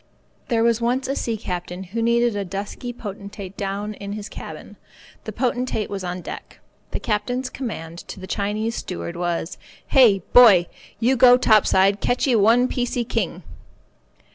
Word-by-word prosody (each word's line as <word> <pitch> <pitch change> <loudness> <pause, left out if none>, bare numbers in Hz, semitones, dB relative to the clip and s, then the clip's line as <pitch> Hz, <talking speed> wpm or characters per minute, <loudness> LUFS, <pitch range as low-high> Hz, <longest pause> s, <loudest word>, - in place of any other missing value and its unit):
There 230 -2 +1
was 235 0 +2
once 250 +3 0
a 275 - -1
sea 230 -4 -2
captain 180 -1 -5
who 205 +5 -4
needed 235 0 +2
a 200 - -1
dusky 200 +6 -5
potentate 200 -3 -8
down 200 +2 -3
in 200 0 -7
his 210 0 -6
cabin. - - -9 0.5
The - - -4
potentate 250 -4 -2
was 195 -2 -4
on 180 0 -4
deck. - - -9 0.3
The - - -3
captain's 245 +4 -2
command 170 -10 -6
to - - -8
the 185 - -8
Chinese 210 +4 -2
steward 175 -5 -5
was 175 0 -3 0.3
"Hey, 220 -9 +5
boy, 215 -8 +8 0.3
you 245 +4 +3
go 250 0 +7
top 215 -4 +4
side 195 +2 +3
catchee 250 0 +1
one 230 +4 +4
piecee 245 -2 -2
king." - - -2
215 Hz, 160 wpm, -22 LUFS, 195-245 Hz, 0.5 s, boy